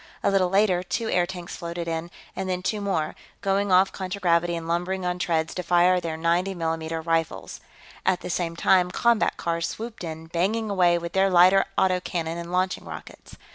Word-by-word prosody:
A - - +3
little 190 -2 +3
later, 195 -2 +3
two 225 +5 -3
airtanks 175 0 -1
floated 170 0 -5
in, 165 +1 -3 0.3
and 190 -1 -3
then 180 0 -2
two 210 +2 -1
more, 185 -6 -1 0.3
going 195 0 +1
off 185 +1 +5
contragravity 175 -3 0
and 165 -1 -5
lumbering 180 +2 -1
on 180 0 -1
treads 160 -3 0
to 180 - -3
fire 180 +1 +3
their 160 -2 -4
90 175 +4 +1
mm 160 -1 -3
rifles. 165 - -1 0.4
At 185 -1 +1
the - - -6
same 170 -1 -2
time, 180 +1 +3
combat 235 +4 +2
cars 170 0 -1
swooped 225 -2 -7
in, 160 -1 -6
banging 200 +7 -1
away 175 -3 +4
with 170 0 -6
their 195 0 +3
lighter 185 +2 +6
auto 185 -1 +3
cannon 170 -2 -3
and 170 0 -7
launching 185 +1 0
rockets. - - -10
180 Hz, 185 wpm, -25 LUFS, 170-190 Hz, 0.4 s, lighter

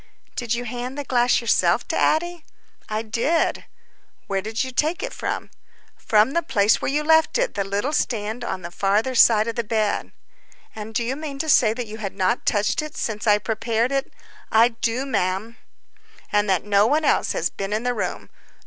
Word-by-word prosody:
"Did 240 -2 -1
you 240 - -3
hand 245 +3 -5
the 290 - -3
glass 245 -2 +2
yourself 235 - +2
to - - -1
Addie?" 345 +1 +1 0.5
"I 215 +1 -2
did." 235 +9 0 0.6
"Where 195 -1 -1
did 220 +4 -2
you 260 - -5
take 310 - 0
it - - -4
from?" - - -4 0.4
"From 215 +3 +2
the 340 - +1
place 210 -9 +2
where - - -1
you 295 +2 0
left 320 +1 +4
it—the 480 - 0
little 205 +9 -2
stand 225 -3 -1
on 185 -6 -4
the 170 - -7
farther 205 +7 +1
side 225 -3 +5
of 230 - -3
the 235 - -1
bed." 215 -1 -1 0.6
"And 220 0 -8
do 235 - +1
you 250 +3 -2
mean 295 -2 -6
to 315 +3 -3
say 225 -6 +4
that 245 0 -4
you 220 +1 -9
had 195 -3 -5
not 190 +4 0
touched 205 +4 +1
it 305 0 -8
since 220 0 -3
I 210 -1 +6
prepared 225 +3 -1
it?" 275 0 -1 0.4
"I 225 +2 +5
do, 230 +2 -2
ma'am." 210 -1 -2 0.7
"And 205 0 +2
that 185 -3 +2
no 205 +1 +3
one 300 +4 +1
else - - +2
has 165 - -1
been 195 0 -5
in 215 +2 -1
the 245 0 0
room?" - - -4
230 Hz, 195 wpm, -23 LUFS, 210-265 Hz, 0.7 s, I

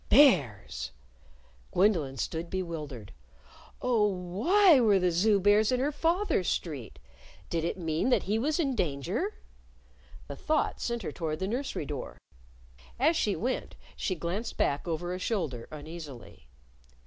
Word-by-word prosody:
Bears! 160 - +4 0.8
Gwendolyn 170 -9 +2
stood 165 +4 -3
bewildered. 155 - -5 0.7
Oh, 230 -4 +3
why 230 - +4
were 215 -5 +5
the 180 -1 +2
Zoo 200 +4 +3
bears 205 +3 +4
in 250 - +2
her 280 +3 +1
father's 335 - +1
street? 135 - -4 0.5
Did 165 -1 0
it 170 - -2
mean 165 +5 0
that 250 - +3
he 215 +3 0
was 300 +7 0
in 280 -5 +1
danger? 140 - -1 0.9
The 140 - -6
thought 310 - 0
sent 235 -2 -2
her 160 - -3
toward 155 0 -3
the 190 - -2
nursery 245 - -3
door. 140 -3 -6 0.8
As 310 +6 +4
she 210 -10 +1
went 255 +3 -3 0.2
she 185 - -2
glanced 180 +8 -4
back 145 +4 0
over 175 +2 -2
a 185 - -4
shoulder 160 - -2
uneasily. 150 - -10
185 Hz, 140 wpm, -29 LUFS, 155-235 Hz, 0.9 s, were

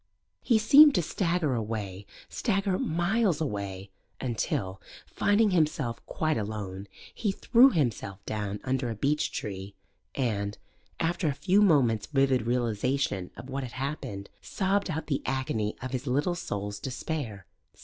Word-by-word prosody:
He 230 - +3
seemed 285 +7 +8
to 175 - +2
stagger 170 -4 0
away, 105 -4 -4 0.2
stagger 195 -4 0
miles 175 +2 +1
away, 100 -8 -4 0.3
until, 100 -6 -2 0.2
finding 205 0 +2
himself 150 -8 0
quite 155 -3 0
alone, 100 -2 -5 0.3
he 210 -4 -1
threw 240 +6 +5
himself 120 - -2
down 105 -1 -3
under 130 -1 -1
a 115 - -3
beech 145 +7 0
tree, 95 -1 -5 0.4
and, 105 -6 -1 0.4
after 170 +1 0
a 145 - +1
few 190 +8 +3
moments' 130 - +3
vivid 135 -5 +2
realization 120 -4 0
of 130 - -9
what 135 +1 -3
had 125 -3 -7
happened, 130 -8 -5
sobbed 195 0 0
out 160 -1 -3
the 140 -4 -1
agony 120 -5 -1
of 130 - -4
his 130 +1 -3
little 145 +7 +1
soul's 105 - -4
despair. 130 -6 -4
130 Hz, 140 wpm, -28 LUFS, 105-165 Hz, 0.4 s, seemed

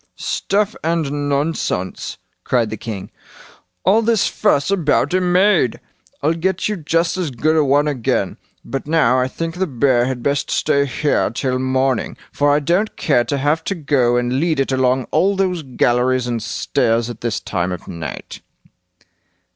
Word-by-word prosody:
"Stuff 205 +2 -1
and 145 -3 -1
nonsense", 140 - -2 0.3
cried 115 -4 +1
the - - -2
king; 105 -3 -7 0.7
"all 215 +4 +5
this 230 -2 +2
fuss 170 -6 +1
about 175 -2 +1
a 185 - +2
maid! 180 - +3 0.4
I'll 155 +3 +3
get 185 +2 -1
you 210 - -1
just 165 +1 0
as 180 -4 -1
good 150 +5 0
a 155 - +4
one 145 +2 +3
again. 130 -6 -1 0.3
But 135 +1 -5
now 150 -6 +3
I 125 - +1
think 165 +4 -4
the 190 0 0
bear 125 -3 +2
had 130 -2 -4
best 140 0 0
stay 140 0 +1
here 145 +2 0
till 130 +2 -2
morning, 130 -1 0
for 145 0 +2
I 145 - +3
don't 175 +9 0
care 120 -6 +2
to 145 - -1
have 150 +4 0
to 195 - -1
go 140 -6 +1
and 125 +2 0
lead 160 -2 0
it 135 - 0
along 130 0 +2
all 190 +6 +2
those 185 -3 0
galleries 125 -1 +1
and 120 -2 -2
stairs 115 +1 0
at 120 - -8
this 120 -3 -1
time 90 -2 -2
of 90 - -7
night." 80 -5 -7
140 Hz, 170 wpm, -19 LUFS, 125-165 Hz, 0.7 s, all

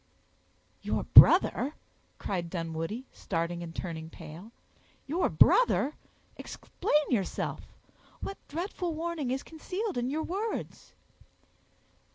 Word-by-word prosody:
"Your - - -1
brother!" 285 +4 +7 0.4
cried 175 -3 -3
Dunwoodie, 165 +7 -4
starting 170 -1 -3
and 165 -1 -8
turning 160 -3 -5
pale; 165 +7 -11 0.5
"your 335 +6 0
brother! 305 - +4 0.4
explain 300 -1 -1
yourself—what 240 - -5
dreadful 345 +1 -3
meaning 325 -4 -3
is 265 +2 -2
concealed 365 - -4
in 245 +1 -1
your 310 +3 -2
words?" 410 +7 -5
260 Hz, 95 wpm, -29 LUFS, -, 0.5 s, brother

